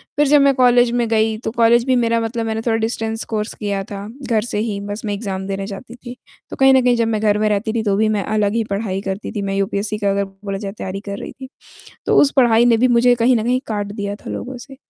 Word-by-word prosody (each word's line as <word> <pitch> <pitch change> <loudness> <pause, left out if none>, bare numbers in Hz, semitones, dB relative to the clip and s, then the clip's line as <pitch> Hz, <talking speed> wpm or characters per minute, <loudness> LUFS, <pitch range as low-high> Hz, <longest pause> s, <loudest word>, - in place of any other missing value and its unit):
फ़िर 295 0 +3
जब 290 +1 +5
मैं 275 0 +4
कॉलेज 245 -1 +4
में 240 -1 0
गई 220 -1 +1
तो - - -2
कॉलेज 235 0 +4
भी 260 - +2
मेरा 230 -1 +2
मतलब 225 0 -3
मैंने 220 0 -2
थोड़ा 225 -1 0
डिस्टेंस 225 0 -2
कोर्स 215 -1 -3
किया 200 -2 -3
था 200 0 -6 0.2
घर 220 -2 +2
से 235 - -4
ही, 210 -2 -2
बस 205 +1 -5
मैं 205 - -2
एग्ज़ाम 195 -2 -4
देने 195 0 -3
जाती 220 +4 -9
थी। 245 0 -10 0.3
तो - - -7
कहीं 270 0 +5
न 260 - +5
कहीं 245 -1 +3
जब 230 -1 +1
मैं 220 -1 -1
घर 210 -1 +2
में 215 0 +1
रहती 210 +2 -1
थी 230 -1 -1
तो 200 -2 +1
भी 215 +1 +2
मैं 210 -2 0
अलग 210 0 0
ही 230 - +1
पढ़ाई 200 -2 -3
करती 195 +1 -5
थी, 210 - -4
मैं 195 0 -2
यूपीएससी 200 +2 -1
का 205 -1 0
अगर 200 0 +1 0.2
बोला 195 -1 -3
जाए 195 -1 -5
तैयारी 190 +1 -5
कर 200 - -4
रही - - -7
थी, 265 -1 -11 0.6
तो - - +3
उस 285 - +4
पढ़ाई 240 -3 +5
ने 235 -1 +5
भी 250 +3 +3
मुझे 245 0 +4
कहीं 240 +1 +3
न 220 - 0
कहीं 250 +2 +1
काट 205 -2 -2
दिया 205 -1 -4
था - - -10
लोगों 255 +1 -5
से। 270 +2 -12
220 Hz, 275 wpm, -19 LUFS, 205-240 Hz, 0.6 s, जब